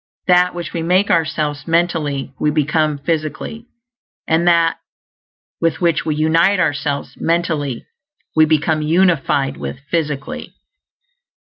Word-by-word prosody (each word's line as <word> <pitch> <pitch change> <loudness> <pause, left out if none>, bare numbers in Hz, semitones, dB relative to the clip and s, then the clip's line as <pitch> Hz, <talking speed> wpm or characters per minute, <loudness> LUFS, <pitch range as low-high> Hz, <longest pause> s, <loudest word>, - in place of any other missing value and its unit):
That 180 0 +3
which 170 -2 -6
we 170 - -2
make 185 +4 +2
ourselves, 155 -3 0
mentally, 165 -5 0
we 150 - +2
become 150 0 +1
physically; 160 - -4 0.6
and 165 +2 +2
that 170 -1 +3 0.8
with 165 -2 +1
which 170 -2 +1
we 155 - 0
unite 165 +5 +3
ourselves 145 -3 -1
mentally 160 -7 -1 0.5
we 155 0 +6
become 155 0 +1
unified 150 -5 +1
with - - -5
physically. 165 - -3
160 Hz, 115 wpm, -18 LUFS, 150-170 Hz, 0.8 s, we